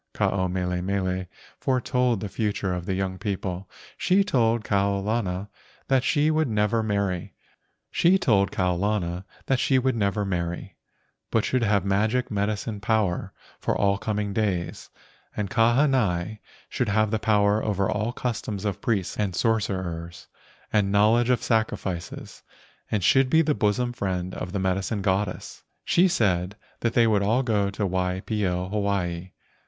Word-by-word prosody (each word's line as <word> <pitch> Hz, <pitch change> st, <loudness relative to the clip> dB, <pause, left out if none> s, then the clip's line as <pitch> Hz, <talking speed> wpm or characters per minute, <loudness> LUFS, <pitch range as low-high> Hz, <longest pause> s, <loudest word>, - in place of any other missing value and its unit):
Ke -, -, -8 dB
ao 95 Hz, -1 st, +1 dB
mele 90 Hz, 0 st, -2 dB
mele 95 Hz, -1 st, -1 dB, 0.3 s
foretold 125 Hz, -3 st, +1 dB
the 105 Hz, -, -3 dB
future 100 Hz, -2 st, -1 dB
for -, -, -9 dB
the 95 Hz, +2 st, -2 dB
young 95 Hz, -1 st, -2 dB
people. 95 Hz, -3 st, -4 dB, 0.3 s
She 195 Hz, +2 st, +3 dB
told 115 Hz, -, +1 dB
Kau 100 Hz, -2 st, +1 dB
lana 100 Hz, -2 st, -2 dB, 0.4 s
that 135 Hz, -2 st, +3 dB
she 150 Hz, +3 st, +2 dB
would 155 Hz, -1 st, +2 dB
never 105 Hz, 0 st, +1 dB
marry, 100 Hz, -4 st, -1 dB, 0.7 s
but 135 Hz, -, +3 dB, 3.0 s
should 130 Hz, -2 st, +2 dB
have 100 Hz, -2 st, +2 dB
magic 110 Hz, +6 st, +1 dB
medicine 105 Hz, +1 st, -2 dB
power 105 Hz, -4 st, 0 dB, 0.3 s
for -, -, -1 dB
all 100 Hz, -1 st, +2 dB
coming 105 Hz, -2 st, -2 dB
days, 95 Hz, -6 st, -2 dB, 0.5 s
and 105 Hz, -2 st, -2 dB
Kahanai 115 Hz, -6 st, +2 dB, 0.3 s
should -, -, -2 dB
have 110 Hz, 0 st, +2 dB
the 110 Hz, -, 0 dB
power 105 Hz, -1 st, +2 dB
over 100 Hz, -2 st, 0 dB
all 110 Hz, +3 st, -1 dB
customs 110 Hz, -5 st, -3 dB
of 100 Hz, -, -2 dB
priests 100 Hz, -6 st, -1 dB
and 100 Hz, -4 st, 0 dB
sorcerers 90 Hz, -8 st, -1 dB, 0.5 s
and 100 Hz, -2 st, +2 dB
knowledge 110 Hz, +4 st, +4 dB
of 125 Hz, -, +2 dB
sacrifices, 100 Hz, -6 st, -2 dB, 0.5 s
and 105 Hz, -4 st, -1 dB
should 135 Hz, +7 st, +4 dB
be 160 Hz, +3 st, +5 dB
the 150 Hz, -1 st, +2 dB
bosom 120 Hz, +1 st, 0 dB
friend 95 Hz, -4 st, -3 dB
of 90 Hz, -, -5 dB
the 100 Hz, -, -2 dB
medicine 95 Hz, +2 st, -1 dB
goddess. 95 Hz, 0 st, -2 dB, 0.2 s
She 180 Hz, +2 st, +4 dB
said 95 Hz, -, +1 dB, 0.2 s
that 115 Hz, -1 st, 0 dB
they 115 Hz, -, +5 dB
would 105 Hz, -3 st, +3 dB
all 115 Hz, +6 st, +2 dB
go 105 Hz, -5 st, +1 dB
to 100 Hz, +1 st, -2 dB
Waipio, 90 Hz, 0 st, -1 dB
Hawaii. 95 Hz, -4 st, -1 dB
105 Hz, 135 wpm, -25 LUFS, 95-115 Hz, 3.0 s, be